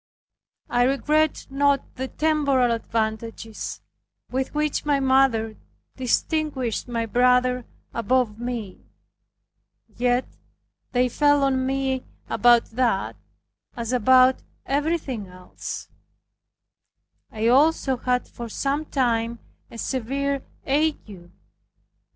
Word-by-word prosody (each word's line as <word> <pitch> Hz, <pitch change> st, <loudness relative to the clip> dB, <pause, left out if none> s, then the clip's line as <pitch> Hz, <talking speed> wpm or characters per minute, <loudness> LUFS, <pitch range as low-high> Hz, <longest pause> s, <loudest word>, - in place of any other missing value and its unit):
I 245 Hz, -, +1 dB
regretted 290 Hz, +4 st, +1 dB
not 280 Hz, 0 st, +1 dB
the 260 Hz, +1 st, -4 dB
temporal 280 Hz, -5 st, +2 dB
advantages 225 Hz, -1 st, -3 dB, 0.5 s
with 260 Hz, +1 st, -1 dB
which 300 Hz, -1 st, 0 dB
my 290 Hz, -2 st, +2 dB
mother 260 Hz, -5 st, +2 dB, 0.4 s
distinguished 260 Hz, -1 st, -1 dB
my 230 Hz, -1 st, -2 dB
brother 250 Hz, +2 st, +2 dB, 0.3 s
above 230 Hz, -2 st, 0 dB
me. 235 Hz, -5 st, -5 dB, 1.1 s
Yet 245 Hz, +1 st, +1 dB, 0.7 s
they 250 Hz, 0 st, +2 dB
fell 290 Hz, +2 st, +3 dB
on 260 Hz, -1 st, +1 dB
me 265 Hz, -1 st, -1 dB, 0.3 s
about 240 Hz, -1 st, +5 dB
that, 230 Hz, -4 st, 0 dB, 0.6 s
as 235 Hz, +1 st, -3 dB
about 255 Hz, +2 st, +5 dB, 0.2 s
everything 280 Hz, -, -1 dB
else. 180 Hz, 0 st, -8 dB, 1.4 s
I 220 Hz, +1 st, -1 dB
also 275 Hz, 0 st, +3 dB
had 250 Hz, 0 st, 0 dB
for 235 Hz, -1 st, -8 dB
some 280 Hz, +6 st, -1 dB
time 235 Hz, -4 st, 0 dB, 0.3 s
a -, -, -11 dB
severe 275 Hz, +3 st, -2 dB, 0.2 s
ague. 265 Hz, -, -1 dB
255 Hz, 95 wpm, -24 LUFS, 230-275 Hz, 1.4 s, about